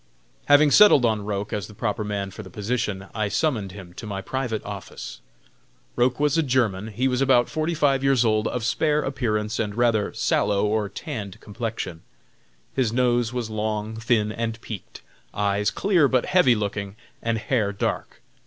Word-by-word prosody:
Having 145 0 +6
settled 205 -11 +7
on 110 -3 +1
Roch 105 -1 -3
as 100 -4 -3
the 105 - -13
proper 105 0 -2
man 100 -2 -3
for 105 - -8
the 95 - -11
position, 105 -1 -2
I 110 -2 -1
summoned 110 - -1
him 95 -3 -11
to 110 - -7
my 100 -2 -4
private 120 +1 -3
office. 100 -10 -8 0.7
Roch 125 +2 +2
was 150 +2 +2
a - - +5
German. 120 -8 0
He 120 +4 -1
was 125 0 0
about 130 -3 +4
forty 160 +2 -1
five 140 -3 +2
years 135 -3 +3
old, 110 -1 +2
of 125 - -3
spare 150 +5 +1
appearance 110 -6 -1
and 105 -2 -2
rather 115 -3 +2
sallow 100 0 +1
or 105 -1 0
tanned 110 - -6
complexion. 105 -6 -5 0.7
His 125 -5 +1
nose 120 -1 +2
was 120 -3 -3
long, 110 0 -2
thin 110 -1 +1
and 115 0 -3
peaked, 110 -6 -8 0.3
eyes 100 0 +1
clear 180 -7 +3
but 130 -2 +1
heavy 180 -10 +4
looking, 100 -1 -3 0.3
and 115 0 0
hair 110 -2 0
dark. 100 - -3
110 Hz, 170 wpm, -24 LUFS, 105-130 Hz, 0.7 s, settled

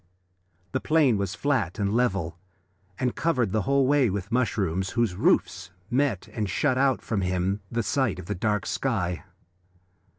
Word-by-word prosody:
The 130 - 0
plain 145 -9 +3
was 100 0 -2
flat 120 - 0
and 100 0 0
level, 95 -9 0 0.6
and 125 -2 0
covered 125 - +1
the 110 +1 +1
whole 140 -1 +4
way 140 -3 +3
with 95 -1 -3
the - - -7
mushrooms, 95 -7 0
whose 120 -5 +1
roofs 90 0 +1 0.2
met 125 -7 +1
and 105 -3 -3
shut 130 +9 +1
out 135 0 +2
from 105 -4 -1
him 90 +2 -1
the 115 0 0
sight 120 -6 0
of 90 - -8
the - - -2
dark 105 +1 -1
sky. 90 -9 -2
110 Hz, 165 wpm, -26 LUFS, 95-130 Hz, 0.6 s, whole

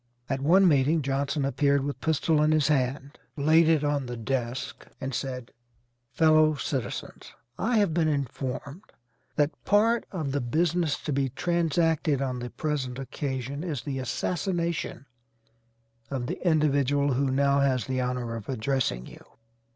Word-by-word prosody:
At 135 0 -2
one 185 +7 +5
meeting 150 +1 +3
Johnson 140 +1 -1
appeared 140 +1 +2
with 140 0 -4
pistol 160 0 +2
in 155 +1 +3
his 155 -1 +2
hand, 140 0 -1 0.2
laid 155 +3 +4
it 155 -3 +3
on 145 -3 0
the 120 0 -5
desk, 120 +1 -3
and 135 +1 -4
said: 125 -1 -4 0.6
"Fellow 155 +1 +4
citizens, 135 -6 -5 0.3
I 230 +2 +1
have 200 -6 +2
been 165 -1 +2
informed 140 +2 -3 0.5
that 145 +1 +2
part 225 +3 +3
of 155 -7 -3
the 140 0 -1
business 160 +5 +1
to 150 - -2
be 135 0 0
transacted 165 -1 +1
on 130 -2 -2
the 125 0 -5
present 135 -5 -3
occasion 135 +1 -4
is 150 -10 -3
the 135 0 -3
assassination 170 - -2 1.0
of 130 -3 -3
the - - -5
individual 145 -4 +2
who 135 +2 +1
now 140 +1 +2
has 130 -4 +1
the 130 -1 -1
honor 125 -2 -2
of 115 0 -8
addressing 125 - -1
you. - - -13
140 Hz, 150 wpm, -27 LUFS, 130-155 Hz, 1.0 s, one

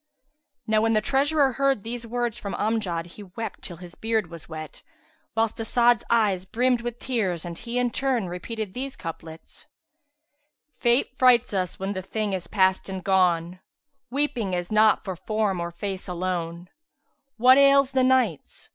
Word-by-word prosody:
Now 215 -1 +2
when 225 0 +2
the 215 - +4
treasurer 275 +4 +2
heard 270 -4 +1
these 235 0 -5
words 240 -1 -2
from 200 -4 -5
Amjad, 200 -7 -1
he 175 +4 -12
wept 205 +3 -7
till 175 - -7
his 175 0 -11
beard 220 -5 -1
was 165 -1 -10
wet, 155 -1 -8 0.5
whilst 225 -1 0
As'ad's 235 0 +3
eyes 210 -6 +2
brimmed 245 +5 +1
with 240 0 -5
tears 200 -12 -2
and 170 -1 -6
he 235 +7 -5
in 250 -1 +1
turn 255 -7 0
repeated 195 +3 -5
these 265 +3 -5
couplets, 165 -1 -9 1.1
"Fate 240 +1 +2
frights 250 -3 +4
us 185 -3 -1
when 195 +1 -2
the 190 - -4
thing 210 +1 -3
is 180 -3 -4
past 190 -1 +1
and 190 -1 -5
gone; 180 -2 +2 0.2
* 285 -2 -53
Weeping 250 -7 -1
is 175 +1 -4
not 215 0 +4
for 190 -2 -3
form 210 0 -1
or 170 0 -3
face 190 +2 -5
alone[FN#366]: 175 -1 -3 0.7
What 255 +3 +7
ails 275 -1 +5
the 260 -1 +2
Nights? 255 - 0
215 Hz, 165 wpm, -25 LUFS, 180-245 Hz, 1.1 s, What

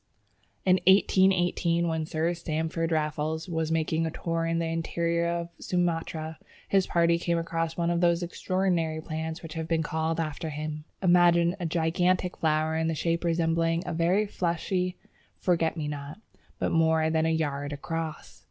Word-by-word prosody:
In 185 -1 +5
1818, 185 -3 +4
when 160 -1 -1
Sir 160 +2 0
Stamford 165 0 -2
Raffles 155 +1 -1
was 160 -2 -2
making 160 0 +1
a 165 - 0
tour 165 +1 -2
in 165 0 0
the 165 - 0
interior 170 +1 -1
of 170 0 -2
Sumatra, 165 -2 -2 0.3
his 195 -2 +2
party 170 0 +3
came 170 0 0
across 165 -1 -2
one 170 0 +1
of 170 0 0
those 170 0 +3
extraordinary 175 -3 -1
plants 160 +1 -5
which 160 -1 -7
have 160 -1 -4
been 165 -1 +1
called 160 +1 -1
after 160 +1 -3
him. 150 0 -5 0.2
Imagine 175 -1 +5
a 175 - -2
gigantic 175 +3 +1
flower 155 0 +1
in 160 0 +1
shape 170 +2 -1
resembling 165 0 +1
a - - -3
very 175 +6 +2
fleshy 180 0 -1 0.4
forget 165 -2 +1
me 150 -2 -2
not, 145 +4 -6 0.4
but - - -1
more 160 -1 +3
than 160 0 +2
a - - +2
yard 145 -3 -1
across! 160 +2 -5
165 Hz, 160 wpm, -28 LUFS, 160-170 Hz, 0.4 s, In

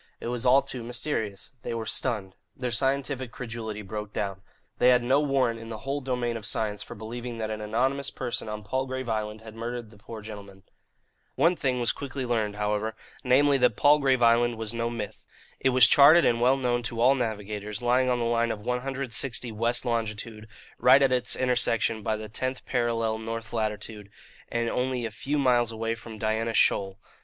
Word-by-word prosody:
It - - -5
was 125 +1 -1
all 135 +2 +6
too 125 - -6
mysterious. 115 -4 -3
They 115 - -4
were 115 -1 -3
stunned. 105 -6 -1 0.2
Their 125 -2 -3
scientific 135 0 0
credulity 115 -3 -6
broke 105 +1 -6
down. 100 -1 -3 0.4
They 125 - +6
had 125 -1 +4
no 130 +4 +3
warrant 135 -5 +1
in 115 0 -9
the 110 - -5
whole 140 +1 -2
domain 125 -3 -2
of 110 - -7
science 105 -2 -1
for - - -8
believing 115 +3 -6
that 110 -1 -3
an 110 0 -4
anonymous 130 +6 0
person 120 -3 -4
on 105 0 -5
Palgrave 130 +3 -3
Island 110 -1 -3
had 110 -1 -11
murdered 115 0 -5
the 105 - -17
poor 110 0 -9
gentlemen. 100 -3 -10 0.7
One 175 +2 +3
thing 130 -6 -1
was 120 0 +2
quickly 135 -1 -5
learned, 110 -4 -1
however; 105 +1 -1 0.3
namely, 135 +2 +4
that 125 -4 +3
Palgrave 140 -3 +4
Island 120 +1 +4
was 110 -1 -2
no 115 0 -1
myth. 115 -3 -6 0.4
It 135 - +2
was 130 0 +7
charted 155 +4 +7
and 120 0 +2
well 130 +2 +4
known 120 -2 0
to 115 -1 -5
all 125 +3 +6
navigators, 105 -3 -4
lying 125 +1 +3
on 125 - +2
the 120 - -1
line 115 0 +1
of 105 -2 -4
160 125 0 -2
west 115 +2 0
longitude, 110 -2 -3 0.3
right 135 +2 +6
at 135 - +3
its 125 -1 +1
intersection 115 -3 +2
by 110 +1 -1
the 110 0 -7
tenth 130 +5 -4
parallel 115 -2 0
north 115 0 -6
latitude, 105 -2 -3 0.4
and 115 0 0
only 125 0 -1
a 115 - -4
few 140 +7 -2
miles 120 -4 +3
away 115 0 -2
from 115 -1 -9
Diana 110 +1 -1
Shoal. 95 -1 +2
115 Hz, 190 wpm, -27 LUFS, 110-125 Hz, 0.7 s, was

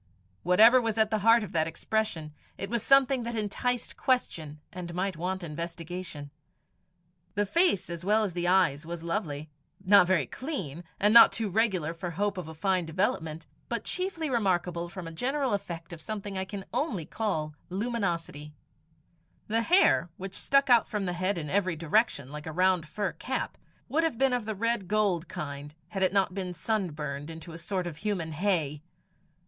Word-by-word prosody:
Whatever 220 +8 +6
was 225 -2 -1
at 220 -1 +3
the 215 - +1
heart 230 +2 +5
of 200 - -7
that 160 -1 +1
expression, 165 -3 -2 0.2
it 195 +2 -5
was 235 -2 0
something 270 +1 +5
that 235 0 -4
enticed 230 +3 -2
question 160 - -1
and 175 -1 -6
might 190 +1 -1
want 185 +3 -3
investigation. 170 -1 -6 1.0
The 205 +1 +2
face 265 - +2
as 170 0 -6
well 210 +3 +3
as 195 -5 -2
the 175 0 -1
eyes 175 -6 +3
was 170 0 -6
lovely 160 -4 -3 0.3
not 200 -2 +7
very 175 -7 +2
clean, 180 - -5 0.2
and 210 +2 +4
not 235 - +10
too 220 -2 -1
regular 185 -7 +1
for 175 +1 -5
hope 200 +3 -1
of 175 - -6
a 160 - -9
fine 185 0 0
development, 160 -2 -1 0.2
but - - -2
chiefly 365 -4 -2
remarkable 180 - 0
from 185 -1 -7
a - - -6
general 265 - -1
effect 170 -4 -4
of 165 - -9
something 205 +1 -5
I 190 0 -2
can 195 0 -7
only 210 - -1
call 160 -6 -2 0.2
luminosity. 175 -8 -3 0.9
The 225 +2 +1
hair, 340 - +4
which 190 0 -7
stuck 275 +6 +2
out 240 -3 +5
from 210 -2 -2
his 175 -1 -2
head 185 +1 0
in 155 -3 -4
every 185 +1 +1
direction, 160 - +1
like 150 +1 -7
a - - -3
round 180 -1 +2
fur 200 +3 -2
cap, 260 +1 -4 0.3
would 325 +3 +1
have 320 -8 0
been 270 0 +3
of 245 -3 -1
the 220 0 -3
red 230 -1 0
gold 195 -5 +1
kind, 145 0 -6
had 190 +2 -4
it 185 - +4
not 195 -2 +2
been 185 -2 -4
sunburned 155 -7 -3
into 165 +1 -9
a 165 - -8
sort 185 +1 -2
of 165 -4 -6
human 185 -4 -2
hay. 155 -4 0
185 Hz, 180 wpm, -29 LUFS, 165-220 Hz, 1.0 s, not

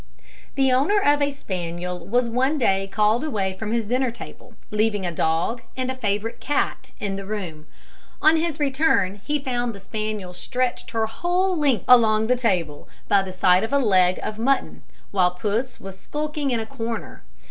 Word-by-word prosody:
The 270 -1 +3
owner 290 +12 +3
of 290 -5 +3
a 285 - +3
spaniel 180 -7 -5
was 245 +3 +2
one 260 +6 +1
day 195 -6 +2
called 215 +4 +2
away 200 -11 -1
from 220 -1 -3
his 230 -1 0
dinner 250 +4 +1
table, 235 - -11 0.2
leaving 210 -2 +1
a 175 - -1
dog 165 +8 0 0.2
and 255 0 -1
a - - -5
favourite 215 -2 -2
cat 260 -1 -1
in 195 -2 -3
the 195 - -5
room. 175 -8 -5 0.5
On 315 +1 +5
his 320 -2 -1
return 270 -9 +1
he 295 0 0
found 245 -4 -2
the - - -10
spaniel 215 -2 -4
stretched 250 +6 -2
her 225 -1 0
whole 355 +10 0
length 280 - +1
along 220 -3 +6
the 250 +3 +3
table, 180 -12 -1 0.2
by 200 - +4
the 190 -1 -5
side 185 0 +4
of 225 - -3
a 280 - +4
leg 185 -8 +3
of 215 0 -4
mutton, 270 +3 0 0.3
while 185 -3 +3
Puss 210 +7 -2
was 190 0 -10
skulking 300 +3 -3
in 240 -3 +1
a 220 - -3
corner. 230 -2 -5
225 Hz, 180 wpm, -23 LUFS, 195-265 Hz, 0.5 s, along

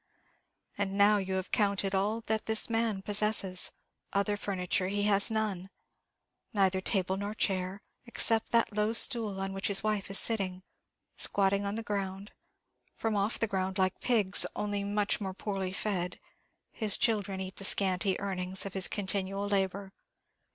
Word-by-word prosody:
And 195 -1 -2
now 205 +1 +5
you 190 -1 -3
have 190 0 -4
counted 200 -3 +1
all 210 +4 0
that 220 -1 -2
this 220 +1 +4
man 225 -4 0
possesses; 205 -3 +2 0.4
other 200 +1 +1
furniture 185 -2 -2
has 205 0 +2
he - - -4
none 195 -4 -2 0.8
neither 190 -2 +2
table 190 -1 0
nor 205 +2 -4
chair, 190 -1 -2 0.2
except 225 -1 +2
that 230 -2 +2
low 210 +1 +1
stool 225 -5 +4
on 195 0 -3
which 195 0 -1
his 200 -1 +1
wife 210 -2 -1
is 195 - +2
sitting. 185 -5 +2 0.5
Squatting 200 0 0
on 200 - -2
the 225 - -4
ground 200 -1 -4 0.6
from 225 -1 -2
off 200 +2 0
the - - +1
ground, 190 -2 -3
like 185 -1 0
pigs, 210 -6 +4
only 205 -1 -2
much 205 +1 0
more 190 -2 -4
poorly 195 -2 -4
fed 185 -3 -3 0.5
his 215 -3 +3
children 205 -4 0
eat 190 0 -6
the - - -7
scanty 190 -1 +1
earnings 190 -1 -1
of 195 - -6
his 190 -2 +4
continual 195 0 -2
labour. 195 -1 -1
200 Hz, 160 wpm, -30 LUFS, 190-210 Hz, 0.8 s, now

